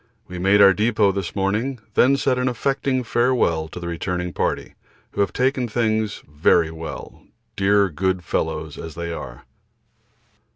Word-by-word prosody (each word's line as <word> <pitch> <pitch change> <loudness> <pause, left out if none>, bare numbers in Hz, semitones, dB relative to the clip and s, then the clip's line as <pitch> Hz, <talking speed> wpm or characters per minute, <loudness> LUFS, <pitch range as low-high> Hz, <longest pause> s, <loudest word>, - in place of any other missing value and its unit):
We 90 0 -7
made 95 +3 +4
our 95 -1 +8
depot 105 -1 +2
this 95 -3 -4
morning, 105 +7 -1 0.2
then 135 +2 +4
said 130 -2 +1
an 125 - 0
affecting 130 +1 0
farewell 120 -10 +1
to 90 - -9
the 85 - -6
returning 90 +1 -3
party, - - -2 0.4
who - - -1
have 100 - +1
taken 130 -1 0
things 110 -2 -1
very 80 +2 +2
well, 80 0 -8 0.3
dear 100 +1 +3
good 90 +2 -1
fellows 80 -2 -3
as 80 -2 -8
they 85 0 -4
are. - - -8
100 Hz, 155 wpm, -22 LUFS, 85-120 Hz, 0.4 s, our